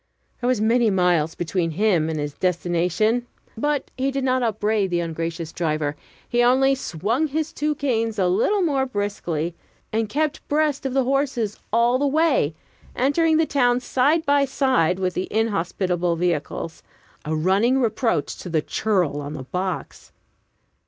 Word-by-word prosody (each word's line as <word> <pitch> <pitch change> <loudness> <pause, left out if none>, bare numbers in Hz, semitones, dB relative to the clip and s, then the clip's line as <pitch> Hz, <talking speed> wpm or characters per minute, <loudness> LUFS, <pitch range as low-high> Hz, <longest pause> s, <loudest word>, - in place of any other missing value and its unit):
There 245 - 0
were 255 -4 +2
many 230 +1 +3
miles 175 -5 +2
between 175 0 -1
him 170 -2 +1
and 155 -1 -2
his 145 -1 -3
destination. 180 +7 0 0.3
But 290 +5 -1
he 265 +1 0
did 275 0 -2
not 255 0 +1
upbraid 215 -3 0
the 175 -1 0
ungracious 165 0 -4
driver; 155 -3 -1 0.3
he 240 - +1
only 260 +3 +4
swung 235 - -1
his 315 +2 -2
two 300 0 -1
canes 230 -6 -1
a 185 -2 +2
little 235 - +2
more 275 -5 +1
briskly, 190 -7 -2 0.4
and 220 -1 0
kept 305 +4 -2
breast 295 -2 +1
of 260 - -4
the 270 - +3
horses 260 -5 -1
all 235 +3 +3
the 285 - +2
way, 285 - +2 0.4
entering 315 +5 +2
the 320 - +3
town 245 -4 +2
side 280 +6 +1
by 285 0 +4
side 260 - +1
with 185 -1 -1
the 185 - -2
inhospitable 180 -5 0
vehicles 165 -1 -2 0.4
a 155 +1 -2
running 195 +11 +2
reproach 225 - 0
to 180 - -8
the 160 -2 0
churl 180 -9 0
on 145 +1 -6
the 140 -4 -6
box. 180 +6 -5
220 Hz, 160 wpm, -23 LUFS, 175-270 Hz, 0.4 s, only